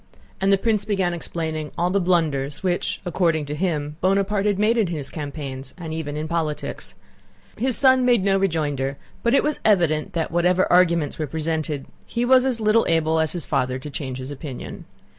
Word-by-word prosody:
And 195 +1 +3
the 195 - +5
prince 215 0 +1
began 190 -4 0
explaining 160 -2 -4
all 175 +1 +1
the 200 +1 +2
blunders 155 -5 0
which, 180 -2 -1
according 165 -3 +1
to 145 - -5
him, 150 -3 -2
Bonaparte 195 +2 +1
had 205 -2 +1
made 215 +3 +3
in 220 -5 +2
his 155 -5 -4
campaigns 140 -3 -6
and 165 -3 -6
even 150 -2 -4
in 155 +1 -3
politics. 160 -2 -3 0.6
His 255 +2 +3
son 260 -1 +5
made 240 -5 +3
no 195 0 +3
rejoinder, 145 -7 -1 0.2
but 235 +3 +2
it - - +4
was 300 0 -1
evident 175 -4 +2
that 165 -2 -2
whatever 180 +2 +3
arguments 170 -5 +3
were 155 - -1
presented 155 -1 -2 0.2
he 235 +1 -1
was 260 +1 +5
as 250 -3 0
little 215 +1 +3
able 160 -1 +2
as 160 -1 0
his 175 -3 -3
father 130 -3 0
to 145 +3 -8
change 130 -3 -5
his 130 +2 -6
opinion. 140 -2 -7
170 Hz, 190 wpm, -23 LUFS, 150-195 Hz, 0.6 s, the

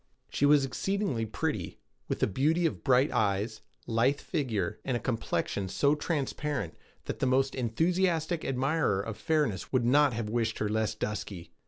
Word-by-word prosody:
She 145 - +2
was 145 -1 +5
exceedingly 170 - -1
pretty, 110 - -3 0.3
with - - -3
the - - +5
beauty 155 - +1
of 160 - -1
bright 130 +1 +4
eyes, 105 +1 0 0.2
lithe 120 +5 +2
figure, 120 - -2
and 130 -3 0
a - - -5
complexion 110 -5 -2
so 140 +9 +3
transparent 145 - -2 0.3
that - - -4
the 135 - +1
most 135 +1 +2
enthusiastic 165 +6 0
admirer 135 -4 +1
of 105 +2 -4
fairness 150 - 0
would 125 -3 +2
not 140 +2 +4
have 115 -1 -3
wished 115 0 -1
her 105 - -1
less 110 0 0
dusky. 100 -5 -5
130 Hz, 160 wpm, -29 LUFS, 110-150 Hz, 0.3 s, was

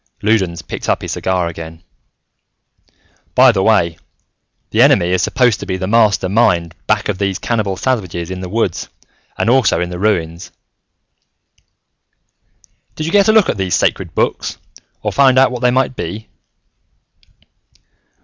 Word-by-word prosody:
Loudons 95 -6 0
picked - - -6
up - - 0
his - - -5
cigar 90 -2 -1
again. 80 0 -9 1.5
"By 130 0 +7
the 95 -4 -1
way, 95 -6 +2 0.7
the - - +2
Enemy 85 +1 +4
is 90 - +1
supposed 120 -3 +1
to - - -8
be 95 - -2
the 95 - -3
master 105 -2 +2
mind 90 -5 +1
back 105 -1 +1
of 100 -2 -3
these 100 -2 -1
cannibal 105 -4 -2
savages 95 -9 -2
in 95 - -5
the 90 - -6
woods 105 -4 -2 0.5
and - - -1
also 120 -7 +3
in 90 +1 -3
the 90 - -6
ruins." 85 -4 -1 2.4
"Did 155 - -4
you 165 - -3
get 200 +1 +4
a - - +6
look 220 -2 +4
at - - -1
these 95 -2 0
Sacred - - -1
Books, - - -1 0.5
or - - -1
find 135 -2 +4
out 130 0 +5
what 125 -1 -5
they 125 - +3
might 130 +1 0
be?" 105 +5 -6
100 Hz, 155 wpm, -16 LUFS, 90-120 Hz, 2.4 s, By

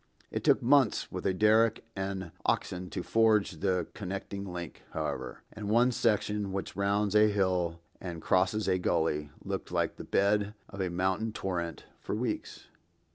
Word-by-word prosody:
It - - -3
took - - +4
months 130 -2 +3
with 90 0 -2
a 95 - +2
derrick 110 +2 +4
and 95 -3 -3
oxen 90 0 -1
to 90 - -4
forge 110 -6 +3
the 95 -1 +1
connecting 100 0 -5
link, 85 -3 -6
however; - - -4
and 105 -1 -5
one 120 +3 +4
section, 105 -3 +1
which 95 0 -4
rounds 100 0 +1
a 105 0 +7
hill 90 -5 +1 0.2
and 85 -3 -5
crosses 95 +5 +2
a 95 -1 +2
gully, 80 -4 0 0.2
looked - - -4
like - - 0
the - - -7
bed 105 +1 +1
of 100 - -6
a 95 - 0
mountain 95 +5 0
torrent 85 -6 -3
for - - -3
weeks. - - -3
100 Hz, 160 wpm, -30 LUFS, 90-105 Hz, 0.2 s, a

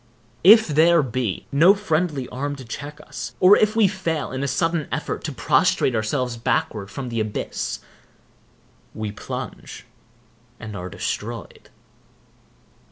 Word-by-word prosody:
If 220 +5 +8
there 160 +1 +4
be 120 -5 -3
no 165 +8 +6
friendly 160 -8 -1
arm 145 +3 -3
to 130 -2 -10
check 145 +6 -7
us, - - -7
or 190 +2 +8
if 215 +1 +2
we 220 -3 +5
fail 175 -6 -2
in 130 +1 -3
a 140 - -1
sudden 165 +2 0
effort - - -3
to - - -3
prostrate 130 - +2
ourselves 120 +2 -1
backward 105 -3 -1
from 125 +5 -6
the 115 -1 -2
abyss, 110 -1 -3 1.1
we 110 -1 -4
plunge, 105 - -7 0.7
and 110 -2 -7
are 90 -1 -6
destroyed. 105 +2 -5
140 Hz, 135 wpm, -23 LUFS, 115-170 Hz, 1.1 s, If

